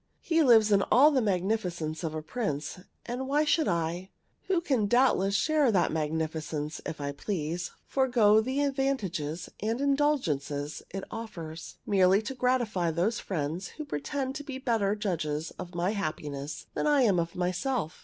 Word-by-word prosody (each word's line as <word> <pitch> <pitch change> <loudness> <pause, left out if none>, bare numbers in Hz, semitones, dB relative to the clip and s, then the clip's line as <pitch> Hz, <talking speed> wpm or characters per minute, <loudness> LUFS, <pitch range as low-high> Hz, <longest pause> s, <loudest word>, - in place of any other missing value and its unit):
He 330 -1 +2
lives 225 -6 +6
in 200 -1 +5
all 280 +7 +7
the 270 -3 +2
magnificence 180 -5 -1
of 160 -1 -3
a 155 - -4
prince: 170 - -3 0.3
and 250 +2 -4
why 295 +3 +2
should 305 +1 +2
I, 170 +2 -1 0.4
who 375 -3 +2
can 265 - +1
doubtless 200 -5 +3
share 300 0 +3
that 180 -4 +2
magnificence 155 -1 -2
if 160 - -5
I 140 0 -2
please, 170 +2 -3 0.2
forego 235 -5 +4
the 260 +5 -1
advantages 210 - -1
and 225 +4 -1
indulgences 165 - 0
it 195 +1 -5
offers, 165 -8 -7
merely 195 +1 +4
to 230 - -4
gratify 240 -9 +1
those 180 +8 0
friends 170 +1 -3
who 305 - -5
pretend 265 - -3
to 290 - -7
be 275 -2 -6
better 225 -6 +1
judges 160 -7 -2
of 175 0 -7
my 175 +3 +1
happiness 150 -7 -4
than - - -1
I 290 -3 +4
am 195 -7 +3
myself? 180 - -1
200 Hz, 155 wpm, -29 LUFS, 160-260 Hz, 0.4 s, all